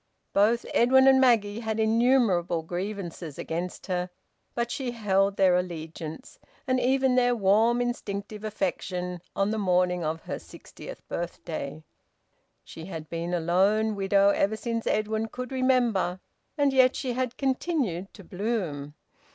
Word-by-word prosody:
Both 220 +4 +3
Edwin 265 +3 +5
and 265 0 +6
Maggie 225 -4 +3
had 220 -1 -3
innumerable 220 -7 +2
grievances 175 -3 -5
against 175 +2 -4
her, 180 -1 -2 0.5
but 235 0 -1
she 265 -3 -3
held 200 -4 +1
their 185 -2 +5
allegiance, 170 - -5 0.3
and 255 -2 +1
even 260 +1 +2
their 245 -1 +3
warm 220 +3 +3
instinctive 210 -3 -4
affection, 180 -4 -3
on 195 +1 +1
the 220 - -1
morning 180 -2 +1
of 160 +1 -2
her - - -5
sixtieth - - -12
birthday. 160 -3 -5 0.8
She 160 - -10
had 160 -4 -8
been 170 +1 -3
a 175 - +1
lone 195 +6 +2
widow 200 0 +3
ever 200 +1 +1
since 230 0 -3
Edwin 220 +1 0
could 250 +3 -7
remember, 245 -8 +1 0.4
and 285 -2 +2
yet 255 -1 +5
she 255 -3 -2
had 250 -1 -2
continued 260 - -1
to 200 - -12
bloom. 180 -8 -3
205 Hz, 140 wpm, -27 LUFS, 180-240 Hz, 0.8 s, and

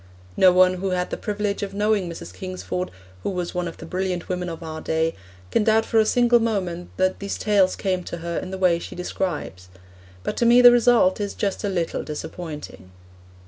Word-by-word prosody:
No 185 - +6
one 185 0 +4
who 195 - -1
had 180 -1 -1
the - - -1
privilege 205 -1 -2
of 200 -1 -4
knowing 205 -3 +1
Mrs. 90 - -8
Kingsford, 90 0 -4 0.3
who - - -2
was 180 -2 -3
one 180 -1 -2
of 165 - -8
the - - -9
brilliant 180 0 -3
women 180 -1 -2
of 165 0 -7
our 160 -1 -6
day, 160 0 0 0.4
can 220 - +2
doubt 220 +1 +3
for 225 - +2
a 215 - +3
single 240 0 +4
moment 185 -6 -2
that 185 0 +1
these 200 0 -4
tales 200 -3 +2
came 185 -2 -1
to - - -5
her 170 0 -3
in 185 - -7
the 190 - -5
way 180 -3 +3
she - - -8
describes; 175 - -4 0.5
but - - -3
to 235 - +2
me 240 +1 +7
the 245 -1 +10
result 235 -5 +4
is 200 -1 -3
just 200 -2 -2
a 205 - 0
little 175 -4 -1
disappointing. 150 - -7
185 Hz, 210 wpm, -23 LUFS, 170-205 Hz, 0.5 s, the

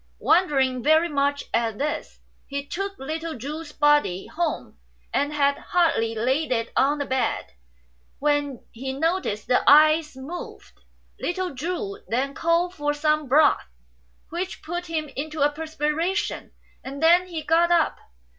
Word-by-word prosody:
Wondering 270 -8 +2
very 315 +5 +4
much 285 -1 0
at 230 -2 0
this, 300 +2 -4 0.3
he 280 0 -4
took 390 +5 -4
little 320 +2 -5
Chu's 295 +5 -6
body 295 -12 +2
home, 340 +2 -3 0.3
and 285 +1 +1
had 280 -1 +1
hardly 275 -11 +1
laid 260 +7 0
it 230 -2 -1
on 285 +2 +3
the 285 - -2
bed 260 -1 -1 0.7
when 290 -3 -1
he 265 +3 -5
noticed 320 - -1
the 250 - +3
eyes 305 0 +5
move. 305 +7 -8 0.5
Little 360 -1 -2
Chu 365 +8 -4
then 265 +4 -1
called 335 +3 +1
for 295 -3 -1
some 305 0 +1
broth, 290 - +4 0.6
which 355 +3 -5
put 350 +2 -4
him 315 -2 -2
into 305 +1 -4
a 290 +1 +4
perspi 310 -1 -2
ration, 355 +5 -2 0.3
and 275 +3 -6
then 350 +3 +5
he 330 -3 -5
got 330 +3 +3
up. 340 -2 +2
300 Hz, 145 wpm, -24 LUFS, 275-330 Hz, 0.7 s, eyes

